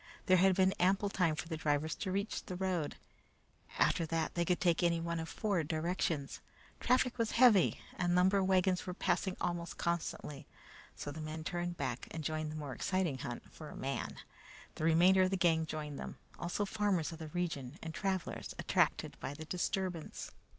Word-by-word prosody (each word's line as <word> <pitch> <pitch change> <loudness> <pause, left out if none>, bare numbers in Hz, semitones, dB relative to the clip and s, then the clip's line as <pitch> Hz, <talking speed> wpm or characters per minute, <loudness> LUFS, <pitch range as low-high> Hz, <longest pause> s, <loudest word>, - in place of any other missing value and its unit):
There 185 -2 +6
had 190 +1 +5
been 190 0 +4
ample 195 +3 +3
time 180 -5 +2
for 165 - -5
the 160 -1 -3
drivers 150 0 +1
to 190 - -3
reach 200 +3 -2
the 180 - -5
road; 180 -5 -1 0.8
after - - +3
that 165 0 -1
they 170 - +1
could 175 +1 +1
take 175 -3 +3
any 170 -1 +3
one 170 0 -2
of 160 - -4
four 200 -7 0
directions. 160 -2 -1 0.4
Traffic 250 0 +2
was 225 -1 +1
heavy, 230 -7 +6 0.2
and 175 0 +2
lumber 190 +2 +4
wagons 185 -1 +2
were 180 - -3
passing 190 -1 0
almost 175 -1 -2
constantly, 170 -3 -3 0.5
so 145 - -5
the 155 +2 -7
men 155 +1 -5
turned 175 +1 -3
back 130 -3 -3
and 160 - -5
joined 155 0 -2
the - - -6
more 145 -3 -5
exciting 175 -3 0
hunt 120 -2 -6
for 155 -2 -9
a - - -9
man. 135 +1 -3 0.6
The 155 - -3
remainder 175 +4 +6
of 185 - +4
the 195 - 0
gang 165 -2 +3
joined 150 -2 -5
them, - - -6 0.2
also 175 +4 -1
farmers 200 -6 0
of 165 - -8
the 160 - -5
region 150 -5 -3
and 160 -1 -5
travelers 190 -1 -2
attracted - - +1
by 140 - -4
the 155 +1 -7
disturbance. 180 -1 -3
170 Hz, 185 wpm, -34 LUFS, 155-185 Hz, 0.8 s, There